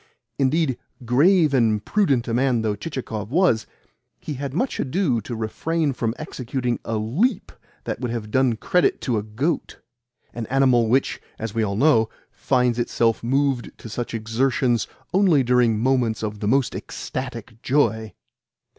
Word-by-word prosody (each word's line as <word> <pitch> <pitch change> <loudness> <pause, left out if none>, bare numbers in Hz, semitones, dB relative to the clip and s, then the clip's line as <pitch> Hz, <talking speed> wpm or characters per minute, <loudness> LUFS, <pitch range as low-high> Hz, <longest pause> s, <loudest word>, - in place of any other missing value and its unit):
Indeed, 135 -1 +1 0.3
grave 155 - +4
and 110 -5 +2
prudent 140 - +1
a 115 - -2
man 125 -2 +2
though 105 -2 0
Chichikov 115 -8 -5
was, 150 -7 +2 0.5
he 150 - -5
had 140 0 -4
much 245 - -1
ado 135 - 0
to 120 +3 -6
refrain 145 +7 -1
from 115 -2 -2
executing 125 -4 -3
a 115 - -2
leap 170 - 0 0.3
that - - -4
would 125 -1 -3
have 115 -2 -4
done 130 -2 +3
credit 180 +9 +2
to 120 -5 0
a - - -3
goat 110 +11 -3 0.5
(an 115 -2 -5
animal 130 -3 +3
which, 130 +4 +1 0.2
as 110 -2 -5
we 115 - 0
all 100 -2 -1
know, 115 -3 +4 0.2
finds 125 -2 +1
itself 115 -1 +1
moved 135 0 0
to 115 - -10
such 120 +1 -4
exertions 120 +1 0 0.3
only 180 -8 +4
during 120 -2 +3
moments 120 -2 +1
of 105 -1 -4
the 105 - -2
most 130 +3 +2
ecstatic 120 -3 -6
joy). 110 -6 +1
125 Hz, 155 wpm, -23 LUFS, 115-140 Hz, 0.5 s, grave